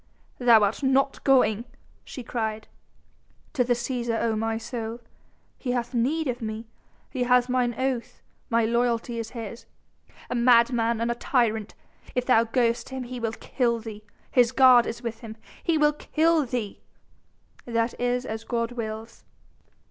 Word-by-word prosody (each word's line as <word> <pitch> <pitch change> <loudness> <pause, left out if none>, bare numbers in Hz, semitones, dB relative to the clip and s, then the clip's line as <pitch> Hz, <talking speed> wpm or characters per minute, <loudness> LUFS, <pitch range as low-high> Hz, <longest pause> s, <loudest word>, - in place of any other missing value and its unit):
"Thou 235 -4 +6
art 205 +6 0
not 270 0 +1
going!" 250 -5 +3 0.4
she 255 - -8
cried. 220 -2 -3 0.9
"To 265 -5 +2
the 245 0 +1
Cæsar, 240 -1 -2
O 225 -1 0
my 225 +1 -1
soul! 230 0 -5 0.6
He 250 -2 -2
hath 240 0 -2
need 280 +7 0
of 245 -1 -3
me! 220 0 -5 0.5
He 260 - -4
has 250 0 +4
mine 250 -2 0
oath; 260 -2 -2 0.3
my 230 -2 +2
loyalty 235 0 0
is 225 -1 -4
his." 230 0 -7 0.6
"A - - -4
madman 235 -1 +3
and 235 +1 +1
a - - +1
tyrant. 230 -3 0 0.4
If 250 0 0
thou 230 -3 +4
goest 235 0 0
to 265 - -8
him 260 - -4
he 250 0 -6
will 225 -1 -2
kill 235 0 -1
thee!... 220 -2 -8 0.3
his 245 -2 +4
guard 255 -2 +6
is 235 +2 -5
with 230 -1 -4
him... 220 -2 -9 0.3
he 335 -2 +2
will 300 0 +4
kill 315 0 +1
thee!" 230 -4 -4 0.9
"That 230 0 0
is 245 +1 0
as 220 -2 -5
God 230 0 -2
wills...!" 225 -1 -6
235 Hz, 160 wpm, -26 LUFS, 225-250 Hz, 0.9 s, Thou